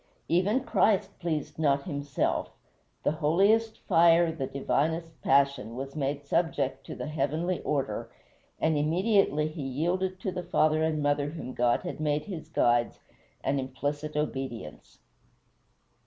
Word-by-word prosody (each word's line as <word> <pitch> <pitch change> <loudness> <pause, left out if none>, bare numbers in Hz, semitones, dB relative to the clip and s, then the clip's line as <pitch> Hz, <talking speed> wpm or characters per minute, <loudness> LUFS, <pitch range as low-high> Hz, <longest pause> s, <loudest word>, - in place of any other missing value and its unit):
Even 200 +9 +2
Christ 205 -5 +1
pleased 160 -4 -3
not 140 -3 +2
himself; 145 -5 -1 0.5
the - - +2
holiest 200 +9 +2
fire, 170 -1 +5
the 145 -5 -4
divinest 160 +4 -1
passion, 135 -4 +2
was 135 +2 -6
made 145 -1 -2
subject 140 -4 0
to - - -6
the - - -5
heavenly 155 +4 -1
order, 135 -8 -2 0.5
and 160 0 +2
immediately 160 0 +2
he 155 0 -6
yielded 175 +8 -1
to 190 - -2
the 180 - -4
father 155 -3 +2
and 155 -2 0
mother 145 0 +1
whom 145 -5 -7
God 120 0 +2
had 175 - -5
made 150 -1 0
his 180 -6 -7
guides 120 0 +2 0.4
an 140 0 +1
implicit 145 +3 -3
obedience. 135 - -4
155 Hz, 135 wpm, -28 LUFS, 140-170 Hz, 0.5 s, fire